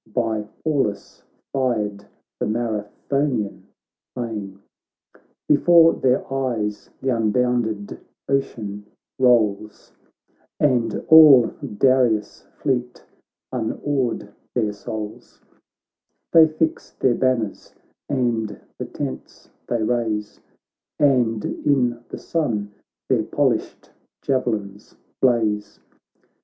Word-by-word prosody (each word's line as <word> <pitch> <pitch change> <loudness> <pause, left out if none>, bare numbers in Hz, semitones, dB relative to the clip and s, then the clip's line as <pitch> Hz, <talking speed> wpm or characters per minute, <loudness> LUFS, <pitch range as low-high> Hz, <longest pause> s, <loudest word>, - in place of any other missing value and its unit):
By 110 -2 -1 0.2
Pallas 135 -10 -1 0.3
fired, 105 -7 -1 0.3
the - - -1
Marathonian 110 +2 -2 0.5
plain. 105 -6 -5 0.9
Before 165 +2 +6
their 130 0 +1
eyes 115 -6 -2
th' - - -7
unbounded 115 -2 0 0.3
ocean 105 -7 -2 0.3
rolls 110 -5 +2 0.7
And 120 -6 +1
all 150 -7 +8 0.2
Darius' 125 -5 +2
fleet 125 -3 -2 0.2
— - - -68
unawed 120 -2 -2 0.2
their 110 -4 0
souls: 105 +1 -7 0.9
They 165 -1 +8
fix 160 +1 -2
their 130 - +2
banners 120 -4 -1 0.3
and 115 -6 -1 0.2
the - - -3
tents 65 - -7 0.2
they 120 -2 0
raise, 110 -2 -1 0.6
And 120 -7 +2
in 125 -4 0
the - - -6
sun 110 -11 -2 0.4
their - - +2
polished - - -1 0.3
javelins 110 -7 -2 0.3
blaze. 105 -5 +1
120 Hz, 85 wpm, -22 LUFS, 105-130 Hz, 0.9 s, all